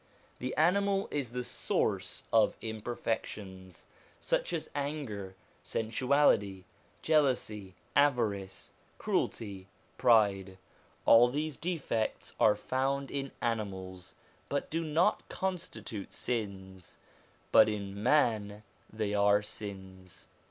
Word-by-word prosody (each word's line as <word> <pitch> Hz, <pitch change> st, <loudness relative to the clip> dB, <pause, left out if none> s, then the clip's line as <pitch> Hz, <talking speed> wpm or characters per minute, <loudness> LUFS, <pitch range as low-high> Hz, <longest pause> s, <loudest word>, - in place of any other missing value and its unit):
The 130 Hz, +1 st, -3 dB
animal 195 Hz, +4 st, +2 dB
is 140 Hz, -5 st, -2 dB
the 125 Hz, 0 st, -3 dB
source -, -, -1 dB
of -, -, +4 dB
imperfections, 105 Hz, -4 st, -5 dB, 0.3 s
such -, -, 0 dB
as -, -, -2 dB
anger, 135 Hz, -10 st, -4 dB, 0.3 s
sensuality, 110 Hz, -5 st, +2 dB, 0.4 s
jealousy, 125 Hz, -, +1 dB, 0.2 s
avarice, 115 Hz, -9 st, +1 dB, 0.3 s
cruelty, 100 Hz, -4 st, -2 dB, 0.3 s
pride: 100 Hz, -6 st, +3 dB, 0.5 s
all 115 Hz, +2 st, +8 dB
these 150 Hz, +3 st, -2 dB
defects 150 Hz, -10 st, -2 dB
are 105 Hz, -, +5 dB
found 135 Hz, +5 st, -1 dB
in 135 Hz, -1 st, -3 dB
animals, 95 Hz, -5 st, -3 dB, 0.3 s
but 140 Hz, -, -2 dB
do 165 Hz, +1 st, 0 dB
not 165 Hz, +6 st, +1 dB
constitute 180 Hz, -, -4 dB
sins. 95 Hz, -6 st, -4 dB, 0.5 s
But 110 Hz, -, +7 dB
in 100 Hz, -1 st, -4 dB
man 110 Hz, -6 st, +2 dB, 0.3 s
they 110 Hz, -1 st, -2 dB
are 105 Hz, 0 st, +4 dB
sins. 95 Hz, -3 st, -7 dB
110 Hz, 95 wpm, -31 LUFS, 100-140 Hz, 0.5 s, all